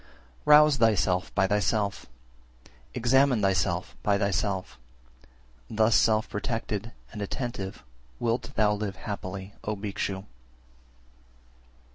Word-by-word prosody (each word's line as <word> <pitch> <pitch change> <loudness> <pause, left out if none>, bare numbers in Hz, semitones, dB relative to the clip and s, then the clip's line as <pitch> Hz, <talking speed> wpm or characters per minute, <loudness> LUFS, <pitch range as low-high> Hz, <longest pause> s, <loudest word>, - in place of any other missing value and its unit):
379. 150 - +9
Rouse 150 -2 +5 0.2
thyself 90 -1 0
by 100 - +3
thyself, 105 +1 0 0.9
examine 125 -1 +3
thyself 95 -4 0
by 100 -1 +2
thyself, 100 - -1 0.9
thus 110 +1 +2
self 110 +2 +3
protected 115 0 -3 0.2
and 105 - -7
attentive 100 -2 -4 0.4
wilt 120 +3 -1
thou 105 -1 +3
live 105 -2 -3
happily, 95 +1 -6
O 105 - -2
Bhikshu! 100 -1 -4
105 Hz, 100 wpm, -27 LUFS, 95-115 Hz, 0.9 s, 379